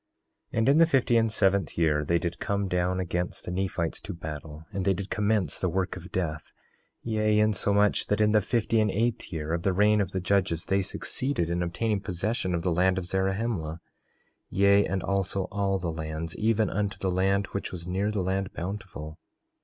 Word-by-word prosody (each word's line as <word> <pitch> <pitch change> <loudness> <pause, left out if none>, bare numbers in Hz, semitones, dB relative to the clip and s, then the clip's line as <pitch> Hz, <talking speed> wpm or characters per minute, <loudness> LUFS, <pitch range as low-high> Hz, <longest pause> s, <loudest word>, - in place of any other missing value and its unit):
4:5 - - -5
And 115 +3 +3
in 140 - +5
the 165 - +7
fifty 130 -6 +2
and 115 -1 +3
seventh 100 -2 +1
year 75 -3 +2
they 85 +3 +2
did 85 0 -3
come 100 -1 -1
down 90 0 0
against 90 -1 -3
the - - -4
Nephites 90 -3 -2
to 100 - -6
battle, 80 -1 -7
and 95 -1 -2
they 95 0 +2
did 100 +1 -6
commence 105 -6 +1
the 95 - +1
work 95 +2 -1
of - - -10
death; 80 -4 -3 0.5
yea, 110 -2 +1
insomuch 105 -1 +2
that 105 - +1
in 105 0 +4
the 105 0 +4
fifty 115 +1 +1
and 105 -1 +3
eighth 115 +4 -1
year 80 -1 -3
of 85 - 0
the 95 +1 +1
reign 105 +2 +4
of 95 -2 -2
the 95 - -1
judges 90 -3 +1
they 95 0 +2
succeeded 100 -1 -1
in 85 0 0
obtaining 100 +4 -1
possession 95 +1 -2
of 85 - -2
the 90 - +1
land 95 +2 +3
of 95 - -2
Zarahemla; 95 -3 -1 0.7
yea, 100 +1 +4
and 95 -1 -2
also 95 0 0
all 100 -1 0
the 85 -3 -3
lands, 80 0 -4
even 110 0 +2
unto 100 -1 -1
the 95 -1 -1
land 95 +2 +2
which 100 - -3
was 85 -2 -6
near 95 +3 -1
the 105 -3 -1
land 95 +1 -1
Bountiful. 85 -4 -6
95 Hz, 200 wpm, -27 LUFS, 85-105 Hz, 0.7 s, the